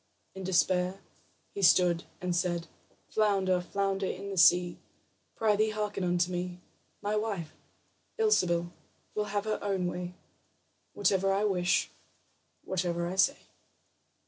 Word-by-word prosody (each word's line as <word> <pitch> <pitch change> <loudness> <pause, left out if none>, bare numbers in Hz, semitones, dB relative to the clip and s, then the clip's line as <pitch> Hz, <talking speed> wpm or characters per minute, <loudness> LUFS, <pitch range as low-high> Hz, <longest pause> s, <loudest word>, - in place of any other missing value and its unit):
In 190 - -7
despair, 185 0 +1 0.5
he 200 - -4
stood 175 -2 +4 0.2
and 180 -1 -1
said: 175 -1 0 0.5
"Flounder, 195 -4 +2
flounder 195 +1 -1
in 200 +1 -5
the - - -4
sea, 175 +1 +5 0.6
Prythee, 215 0 +2
hearken 210 -2 -3
unto 175 0 +1
me: 180 0 -4 0.4
My 205 +1 0
wife, 200 -8 -2 0.6
Ilsebil, 175 - +2 0.4
will 210 - -1
have 205 0 -2
her 215 -1 -1
own 195 -3 0
way 180 0 -4 0.8
Whatever 195 -1 +2
I 195 +2 +1
wish, 180 -4 +1 0.7
whatever 175 -2 -1
I 175 +2 -3
say." 275 +9 +3
185 Hz, 120 wpm, -30 LUFS, 175-205 Hz, 0.8 s, sea